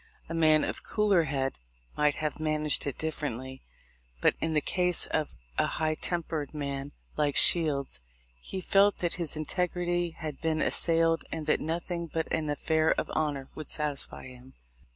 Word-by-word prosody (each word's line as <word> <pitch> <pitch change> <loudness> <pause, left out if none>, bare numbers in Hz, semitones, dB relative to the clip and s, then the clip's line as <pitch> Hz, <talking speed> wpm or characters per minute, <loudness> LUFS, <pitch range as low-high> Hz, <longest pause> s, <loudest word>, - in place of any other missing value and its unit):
A 165 - -6
man 155 -2 +4
of - - -3
cooler 205 -6 +2
head 135 -2 -2 0.4
might 150 -1 +2
have 155 0 -3
managed 155 -1 0
it 140 - -3
differently, 130 -4 -4 0.6
but - - +4
in 160 0 0
the 155 - +3
case 180 +3 +2
of 155 -2 -2 0.2
a - - +3
high 155 0 +1
tempered 160 -3 -3
man 140 -1 -4 0.3
like 145 -2 +1
Shields 140 - +4 0.4
he 190 - -5
felt 200 +2 +4
that 175 -1 -1
his 160 -2 -2
integrity 175 +1 -1
had 150 -3 -6
been 160 -1 0
assailed 165 0 +3
and 160 -2 -4
that 150 - +1
nothing 170 +2 -3
but 160 0 -2
an 155 -2 -1
"affair 155 +2 +1
of - - -4
honor" 145 -4 -2
would 155 - -8
satisfy 150 -2 -1
him. 130 0 -13
155 Hz, 160 wpm, -29 LUFS, 145-165 Hz, 0.6 s, man